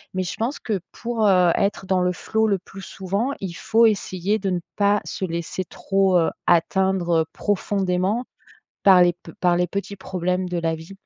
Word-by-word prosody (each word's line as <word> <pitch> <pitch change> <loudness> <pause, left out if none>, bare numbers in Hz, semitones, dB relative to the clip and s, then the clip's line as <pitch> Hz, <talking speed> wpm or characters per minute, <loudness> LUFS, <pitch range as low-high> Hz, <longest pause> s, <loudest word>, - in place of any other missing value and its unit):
mais 185 - 0
je 175 - -4
pense 240 +6 -2
que 210 -4 -2
pour, 230 -2 -2
heu, 180 -3 +5
être 200 -1 0
dans 185 -1 +1
le 180 0 +2
flow, 220 +4 0
le 200 -2 +2
plus 195 +1 -12
souvent, 200 +7 -3
il 185 -3 -4
faut 225 +6 +3
essayer 205 -1 0
de 195 -1 -2
ne 180 -1 0 0.2
pas 205 0 +2
se - - -6
laisser 170 +1 -4
trop, 195 0 +1
heu, 165 - +2 0.2
atteindre, 175 0 +2
heu, - - -1
profondément 200 +2 0 0.6
par 190 -2 +7
les 175 - +3
p 170 -1 -14
par 175 -1 +3
les 180 0 +1
petits 200 +2 -4
problèmes 185 -1 -2
de 180 - -2
la 165 -1 0
vie 160 +3 -11
190 Hz, 195 wpm, -23 LUFS, 180-200 Hz, 0.6 s, par